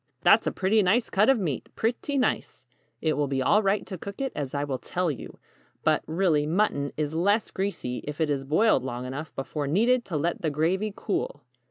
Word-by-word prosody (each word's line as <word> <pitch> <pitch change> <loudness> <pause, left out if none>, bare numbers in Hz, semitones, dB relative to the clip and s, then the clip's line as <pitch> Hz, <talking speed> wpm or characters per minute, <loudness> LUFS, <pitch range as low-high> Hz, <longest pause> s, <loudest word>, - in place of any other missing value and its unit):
"That's - - +5
a - - +2
pretty 200 +3 +2
nice 215 +5 +2
cut 210 +5 +4
of 270 - +5
meat 160 - -3
pretty 245 +5 -1
nice. 255 - -1 0.4
It 155 - +2
will 145 -1 0
be 135 -1 -1
all 205 +11 +4
right 200 0 +1
to 185 - -7
cook 200 +3 -8
it 270 -1 -1
as 145 -2 -4
I 140 - 0
will 135 -3 -3
tell 180 -2 -1
you. 135 - -8 0.5
But, - - +3
really, 160 -3 +2
mutton 155 -5 +1
is 150 0 -1
less 200 +6 +1
greasy 190 -11 -3
if 150 +1 -5
it 155 -2 +1
is 140 -1 -1
boiled 155 - +3
long 125 -1 -4
enough 140 +4 -5
before 140 +2 -3
needed 235 - +3
to 165 - -2
let 170 +4 -1
the 160 - +1
gravy 175 +8 0
cool. - - -3
165 Hz, 210 wpm, -26 LUFS, 145-205 Hz, 0.5 s, That's